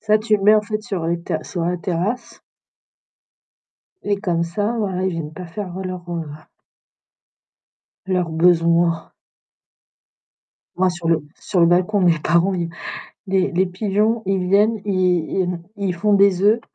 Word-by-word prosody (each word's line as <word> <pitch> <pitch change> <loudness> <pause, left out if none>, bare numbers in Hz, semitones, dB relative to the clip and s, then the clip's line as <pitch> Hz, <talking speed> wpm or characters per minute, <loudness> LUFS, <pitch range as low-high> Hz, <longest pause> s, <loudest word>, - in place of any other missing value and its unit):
ça 215 0 +3
tu 215 0 +2
le 195 - -7
mets 210 +2 +6
en 215 - +4
fait 215 0 -4
sur 190 -8 -3
les 170 0 -1
ter - - -3
sur 170 -2 -3
la 180 +1 0
terrasse 195 +6 -3 1.6
et 205 -1 -1
comme 170 -4 0
ça, 205 +6 -1
voila 190 -3 -1
ils 190 - 0
viennent 165 -3 -5
pas 180 +1 -8
faire 180 +1 -6
leurs, 185 -2 -6
heu 170 -1 -3 1.8
leurs 180 -3 0
besoins. 170 0 +2 1.7
Moi 185 0 +3
sur 175 -2 -5
le 165 -2 +2 0.2
sur 190 -4 -1
le 170 - +6
balcon, 180 +4 +2
de - - +3
mes 165 -2 +3
parents 170 +5 +2
ils 170 -2 -2 0.6
les 190 -1 +1
les 185 +2 +2
pigeons, 210 +4 0
ils 190 -2 0
viennent, 210 +2 +3
ils 185 -4 +1
ils 190 - 0
m 175 -1 -3
ils 195 -3 -2
font 205 +4 +2
des 195 -2 +4
œufs, 215 +3 +4
185 Hz, 165 wpm, -20 LUFS, 170-205 Hz, 1.8 s, mets